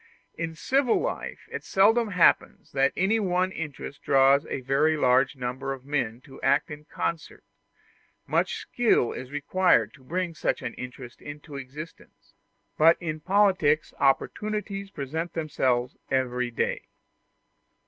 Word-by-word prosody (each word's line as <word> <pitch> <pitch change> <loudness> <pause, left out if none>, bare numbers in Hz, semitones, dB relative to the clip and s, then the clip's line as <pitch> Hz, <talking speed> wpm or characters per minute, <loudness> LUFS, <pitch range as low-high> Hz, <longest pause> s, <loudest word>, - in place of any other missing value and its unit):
In 165 -1 -4
civil 260 - +2
life - - -4
it - - -5
seldom 225 +4 +3
happens 180 -4 +2
that 135 0 +2
any 200 +5 +2
one 185 -2 +1
interest 150 -4 -7
draws 135 +1 +4
a - - -4
very 145 +5 +2
large 130 +2 +3
number 130 +1 -3
of 130 -1 -11
men 125 -5 -2
to 135 - -14
act 140 +3 +2
in 150 0 -9
concert; 165 +1 -4 0.8
much 475 - 0
skill 235 - +2
is 125 - -7
required 145 - +2
to 135 - -18
bring 175 +5 -2
such 155 - -2
an 120 - -4
interest 125 -1 -9
into 145 0 -9
existence: 140 +4 -10 0.5
but 165 +2 +6
in 155 -3 -4
politics 185 -5 +2
opportunities 200 +7 0
present 160 +1 -4
themselves 130 -6 0
every 125 -2 0
day. 120 - -2
150 Hz, 135 wpm, -26 LUFS, 130-180 Hz, 0.8 s, but